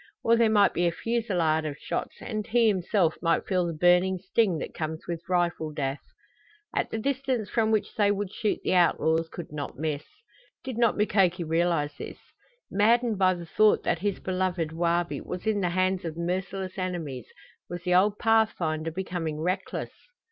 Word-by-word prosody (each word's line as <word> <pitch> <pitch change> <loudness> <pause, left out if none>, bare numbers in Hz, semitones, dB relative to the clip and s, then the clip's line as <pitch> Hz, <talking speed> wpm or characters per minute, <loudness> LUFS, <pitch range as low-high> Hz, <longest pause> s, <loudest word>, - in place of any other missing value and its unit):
Or 230 - +5
there 230 -1 +4
might 205 -2 +4
be 175 0 +1
a - - +2
fusillade 175 -7 0
of 150 -2 -4
shots - - -4
and 215 -2 -4
he 230 0 +3
himself 185 -3 +1
might 165 -1 +1
feel 180 -3 +1
the 170 - -3
burning 180 +3 +3
sting 190 0 +1
that - - -6
comes 160 0 -4
with 170 0 -5
rifle 175 -3 0
death. 140 -2 -3 0.7
At - - 0
the - - -3
distance 260 -3 -1
from 225 -2 +2
which 215 -2 0
they 205 -2 +2
would 205 -1 -2
shoot 215 - -1
the - - +1
outlaws 165 -2 +3
could 170 -2 -8
not 145 -3 -6
miss. 150 0 -2 0.6
Did 260 -2 -5
not 235 -2 +3
Mukoki 190 -4 +2
realize 165 -2 0
this? - - -7 0.5
Maddened 225 +1 +3
by 185 -1 +4
the 175 -1 -8
thought 215 +5 +3
that - - 0
his 200 +1 -1
beloved 185 -3 -1
Wabi 170 +1 0
was 180 +3 -6
in 215 -2 +1
the 180 - +1
hands 185 +1 +1
of 165 -1 -5
merciless 185 +2 -3
enemies, 165 -9 -4 0.4
was 175 0 -6
the 180 0 +1
old 200 +3 +4
pathfinder 180 -9 +1
becoming 165 -3 -4
reckless? 180 +4 -2
180 Hz, 175 wpm, -27 LUFS, 165-205 Hz, 0.7 s, Or